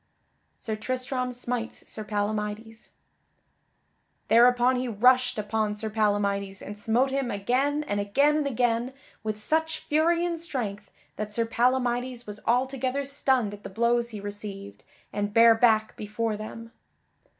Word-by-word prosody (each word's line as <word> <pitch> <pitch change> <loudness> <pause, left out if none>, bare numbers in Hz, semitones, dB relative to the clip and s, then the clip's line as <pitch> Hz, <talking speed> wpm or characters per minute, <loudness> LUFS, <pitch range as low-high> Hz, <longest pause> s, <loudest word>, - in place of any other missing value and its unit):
[Sidenote: - - -24
Sir 220 -1 -4
Tristram 255 +1 -2
smites 245 -1 -4
Sir 215 - -5
Palamydes] 210 +1 -3 1.4
Thereupon 245 +2 +5
he 250 0 -2
rushed 250 +3 +3
upon 215 0 -1
Sir 215 +1 -5
Palamydes 200 -2 0
and 205 - -7
smote 230 +6 +1
him 270 -2 -1
again 260 +9 0
and 205 -8 -2
again 280 +10 +3
and 295 -2 0
again 245 0 0 0.3
with 215 -1 -3
such 320 +7 0
fury 335 +3 +2
and 340 -1 -2
strength 220 -11 -5 0.3
that 210 -1 -5
Sir 230 - +1
Palamydes 245 +1 0
was 210 0 -8
altogether 260 +2 0
stunned 265 -6 +1
at 205 - -10
the - - -8
blows 235 +3 +1
he 215 -3 -7
received 205 -1 -7 0.3
and 205 0 -2
bare 230 0 +8
back 225 -1 +3
before 215 +1 -2
them. 225 +2 -8
230 Hz, 140 wpm, -27 LUFS, 210-255 Hz, 1.4 s, bare